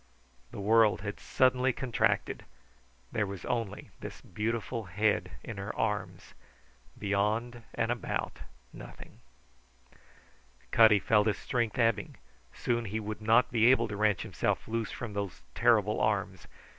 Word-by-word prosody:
The - - -9
world 110 0 +4
had 105 0 -5
suddenly 130 0 +2
contracted; 125 -2 0 0.7
there 105 -2 0
was 100 -2 -7
only 115 -4 -3
this - - -8
beautiful 115 +3 -3
head 105 +4 0
in 110 - -7
her 100 +2 -5
arms; 105 -2 -3 0.6
beyond 105 +4 -1
and 115 - 0
about, 120 - -3 0.3
nothing. - - -12 1.5
Cutty 110 -2 +7
felt 105 +1 +3
his 105 - +1
strength 120 -4 -2
ebbing; 115 -4 +1 0.4
soon 120 -1 -1
he 110 +2 -3
would 110 0 -5
not 115 +3 +4
be 115 -1 +4
able 120 -2 +5
to 105 - -4
wrench 105 -1 +1
himself - - -2
loose 115 -1 -2
from 115 -4 -6
those 100 -10 -4
terrible 110 -3 +3
arms. 100 -3 -1
110 Hz, 130 wpm, -30 LUFS, 105-115 Hz, 1.5 s, Cutty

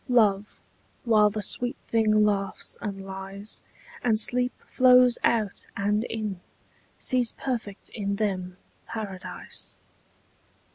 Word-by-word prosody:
Love, 210 -4 +2 0.4
while 215 -3 +5
the 210 0 -3
sweet 245 +5 +1
thing 215 -2 +2
laughs 200 -2 0
and 195 -2 -5
lies, 195 +2 -5 0.4
And 220 -3 +3
sleep 250 +2 +3
flows 250 -1 +5
out 220 -4 +1
and 210 +3 +1
in, 215 -6 -4 0.6
Sees 250 -2 +2
perfect 230 -6 -5
in 200 -2 -3
them 185 -4 -2 0.3
Paradise. 200 -4 -7
215 Hz, 105 wpm, -26 LUFS, 200-235 Hz, 0.6 s, while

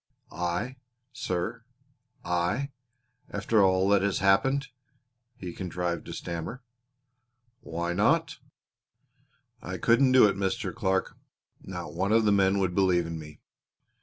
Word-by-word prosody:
"I, 90 +10 -3 0.4
sir! 115 -1 -3 0.6
I? 90 +11 0 0.6
After 110 -2 +1
all 95 0 +3
that 100 -1 +4
has 100 -1 +1
happened?" 135 +9 +2 0.7
he 90 -2 -7
contrived 90 -2 -3
to - - -6
stammer. 85 +9 -5 1.0
"Why 85 +1 -3
not?" - - +2 1.2
"I - - -5
couldn't 130 +3 +4
do 130 -4 +8
it, 100 - 0
Mr. 95 -1 -2
Clark. 95 -4 -1 0.5
Not 90 -5 -7
one 95 +5 -1
of 110 0 +4
the 105 - +4
men 100 -1 +3
would 95 -2 0
believe 90 -2 +3
in 85 -1 -5
me. 75 -1 -12
95 Hz, 125 wpm, -28 LUFS, 85-110 Hz, 1.2 s, do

